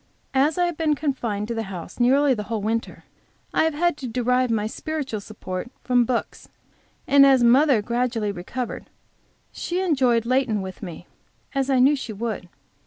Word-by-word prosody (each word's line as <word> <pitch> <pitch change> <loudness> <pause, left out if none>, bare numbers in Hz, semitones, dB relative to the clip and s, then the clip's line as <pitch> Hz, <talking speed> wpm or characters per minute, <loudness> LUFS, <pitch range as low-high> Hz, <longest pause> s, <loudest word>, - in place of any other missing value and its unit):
As 280 +5 +2
I 355 - +3
have 345 -3 -3
been 310 -2 +1
confined 240 -8 -2
to 235 - -3
the 225 - -2
house 180 +2 -8
nearly 270 +3 +4
the 215 - -3
whole 220 -3 -2
winter, 225 +2 -2 0.5
I - - +3
have 320 -2 0
had 345 0 +1
to 265 - -6
derive 250 +2 +1
my 215 -2 0
spiritual 270 -1 -4
support 195 0 -6
from 245 -1 +3
books, 235 -1 -3 0.6
and 280 0 +6
as 265 -3 +5
mother 250 -1 +5
gradually 235 -2 -1
recovered, 215 +7 -6 0.6
she 350 +1 -3
enjoyed 260 -10 +2
Leighton 245 -5 +1
with 190 -1 -8
me, 175 -3 -8 0.5
as 275 -1 0
I 265 - +3
knew 270 +4 +5
she 260 -5 -6
would. 210 -4 -4
250 Hz, 175 wpm, -23 LUFS, 220-275 Hz, 0.6 s, and